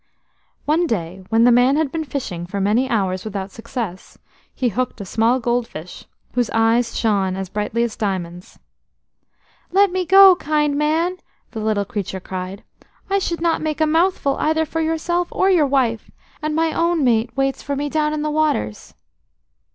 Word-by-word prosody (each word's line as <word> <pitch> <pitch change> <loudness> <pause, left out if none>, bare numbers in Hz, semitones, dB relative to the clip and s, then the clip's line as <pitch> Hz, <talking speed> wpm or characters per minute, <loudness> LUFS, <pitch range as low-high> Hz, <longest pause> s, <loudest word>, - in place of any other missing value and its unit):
One 330 +3 +2
day 185 - -3
when 225 +1 +3
the 245 - +6
man 245 +3 +4
had 310 -3 0
been 325 -1 -2
fishing 215 - -5
for 200 +2 -4
many 220 +7 +1
hours 190 -6 0
without 195 -2 -5
success, 225 -5 -6 0.3
he 250 -2 -1
hooked 250 +2 -3
a 200 - -6
small 225 +6 +1
gold 240 0 0
fish, 155 +3 -10 0.3
whose 245 -1 0
eyes 230 +1 +2
shone 195 -4 +1
as 190 -1 -5
brightly 210 +3 -1
as 235 -2 -3
diamonds. 180 -4 -4 1.1
"Let 395 +1 +4
me 365 -1 -2
go, 385 +1 +8
kind 300 -2 0
man," 320 +5 0 0.3
the 225 - -6
little 215 -2 0
creature 195 -1 -4
cried. 185 +2 -6 0.5
"I 395 - +3
should 340 -3 -3
not 335 -1 +1
make 310 -1 -2
a 315 - +4
mouthful 320 -3 +1
either 315 +1 +1
for 325 +1 -3
yourself 335 +2 0
or 380 +1 +2
your 325 -6 +4
wife, 250 -5 0 0.3
and 305 0 -2
my 325 0 +1
own 335 -2 +1
mate 235 0 +1
waits 270 0 0
for 280 - -3
me 290 +1 -2
down 300 0 0
in 305 -1 -2
the 305 - -1
waters." 295 - -1
250 Hz, 175 wpm, -20 LUFS, 210-315 Hz, 1.1 s, go